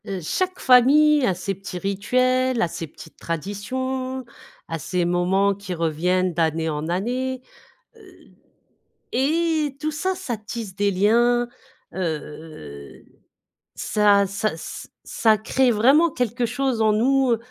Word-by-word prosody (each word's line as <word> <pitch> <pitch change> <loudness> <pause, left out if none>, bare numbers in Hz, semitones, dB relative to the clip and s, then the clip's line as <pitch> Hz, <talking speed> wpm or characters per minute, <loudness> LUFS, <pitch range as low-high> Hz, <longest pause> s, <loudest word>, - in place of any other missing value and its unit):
Heu, 195 -1 -3
chaque 370 - -2
famille 285 +3 +5
a 185 - +1
ses 190 +2 -3
petits 195 -1 -8
rituels, 255 +6 +1
a - - +2
ses 165 0 -6
petites 160 +1 -15
traditions, 255 - -4 0.4
a 165 - -4
ses 175 +4 -1
moments 185 +3 +2
qui 195 -2 -6
reviennent 175 +3 0
d'année 160 -1 0
en 150 0 -3
année. 250 +8 -2 0.5
Heu. - - -18 0.9
Et 305 +1 0
tout 310 - -1
ça, 345 +5 -2
ça 360 -11 -4
tisse 215 -2 -7
des 205 +1 +1
liens. 235 +5 +2 0.5
Heu. 150 - -7 0.7
Ça 205 -1 +3
ça 200 +3 -2
s 160 - -8
ça 220 -2 +2
crée 250 +4 +2
vraiment 270 +10 +4
quelque 245 -2 -1
chose 250 0 -1
en 215 -1 +4
nous, 255 +2 +3
215 Hz, 130 wpm, -23 LUFS, 180-260 Hz, 0.9 s, famille